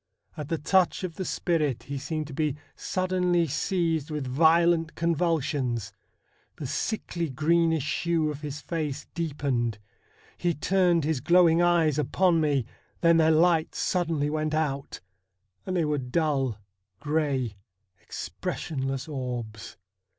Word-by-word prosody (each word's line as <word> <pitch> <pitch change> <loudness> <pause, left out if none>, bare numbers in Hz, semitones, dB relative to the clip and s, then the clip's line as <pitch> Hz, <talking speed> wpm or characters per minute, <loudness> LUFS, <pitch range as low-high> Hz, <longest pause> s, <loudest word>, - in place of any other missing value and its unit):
At 150 -2 -6
the 165 - 0
touch 185 +4 +2
of 170 -3 -5
the 190 - -2
spirit 155 -10 0
he 140 0 -5
seemed 155 +2 -3
to 145 - -9
be 150 -1 0 0.2
suddenly 180 -2 +1
seized 165 0 -1
with 150 -3 -3
violent 165 +4 +3
convulsions. 150 - 0 0.6
The 150 - -6
sickly, 170 - -2
greenish 160 +2 +1
hue 165 -3 +1
of 145 0 -8
his 150 -1 -5
face 150 -3 -3
deepened. 140 -8 -1 0.6
He 175 -2 +1
turned 175 -1 +2
his 155 -2 0
glowing 170 +3 +5
eyes 165 -4 +3
upon 170 +3 +2
me, 145 -5 +1 0.4
then 170 -1 +5
their 160 -1 +4
light 160 0 +3
suddenly 160 -5 0
went 155 0 -1
out, 140 -3 -2 0.7
and 185 -1 -1
they 165 - +2
were 150 -1 0
dull, 135 -3 0 0.4
grey, 140 -7 -1 0.4
expressionless 135 -2 -4
orbs. 125 -7 -5
155 Hz, 130 wpm, -27 LUFS, 140-170 Hz, 0.7 s, glowing